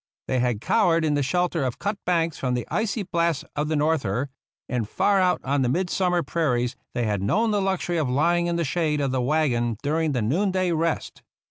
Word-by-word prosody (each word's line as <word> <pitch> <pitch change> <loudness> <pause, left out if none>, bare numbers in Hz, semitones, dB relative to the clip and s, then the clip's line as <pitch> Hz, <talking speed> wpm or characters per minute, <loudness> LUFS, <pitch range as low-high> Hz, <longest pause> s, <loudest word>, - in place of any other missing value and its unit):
They 130 - +1
had 120 -4 0
cowered 165 - +2
in 150 - +1
the 145 - +1
shelter 170 +3 0
of 125 -2 -2
cut 205 +1 -2
banks 165 -3 +1
from 125 -2 0
the 120 - -3
icy 215 0 -1
blast 170 -4 0
of 150 +1 -1
the 155 - 0
norther, 145 -5 0 0.4
and 115 -4 -2
far 200 -1 +2
out 180 -1 +2
on 140 +1 0
the 125 - +1
midsummer 180 +2 +1
prairies 125 -6 0 0.2
they 120 - 0
had 105 -3 -1
known 215 - +1
the 205 -1 +1
luxury 190 -2 -1
of 150 -5 0
lying 170 +6 +2
in 170 - 0
the 170 - 0
shade 150 +1 0
of 140 -2 0
the 130 -1 0
wagon 120 -5 +1
during 155 +1 0
the 125 -4 0
noonday 185 - +1
rest. 165 0 -2
155 Hz, 210 wpm, -24 LUFS, 130-175 Hz, 0.4 s, cowered